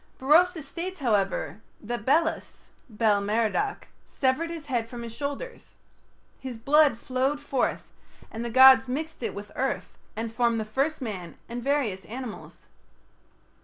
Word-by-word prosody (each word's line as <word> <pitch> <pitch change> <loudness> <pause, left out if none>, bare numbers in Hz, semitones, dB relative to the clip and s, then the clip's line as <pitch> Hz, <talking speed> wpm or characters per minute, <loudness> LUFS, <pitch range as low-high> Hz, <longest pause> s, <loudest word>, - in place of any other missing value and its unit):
Berosus 320 +3 +4
states, 355 +5 -5
however, 200 - 0 0.2
that 235 +1 -5
Belus 320 +4 0 0.2
(Bel 210 -2 +2
Merodach) 225 - 0 0.2
severed 270 +5 0
his 330 -3 -7
head 240 -5 -2
from 240 -1 -7
his 230 -1 -7
shoulders. 285 - -6 0.6
His 260 -3 -6
blood 280 +1 +4
flowed 260 +4 -1
forth, 275 -3 -1 0.5
and 225 +1 -5
the 235 - -3
gods 260 +2 +8
mixed 310 +5 -4
it - - -3
with 205 0 -8
earth 270 +1 -3 0.2
and 225 0 -4
formed 235 -1 +2
the 215 - -3
first 275 +8 -1
man 185 -8 -6
and 240 +1 -5
various 250 -10 0
animals. 245 0 -8
255 Hz, 140 wpm, -27 LUFS, 225-290 Hz, 0.6 s, gods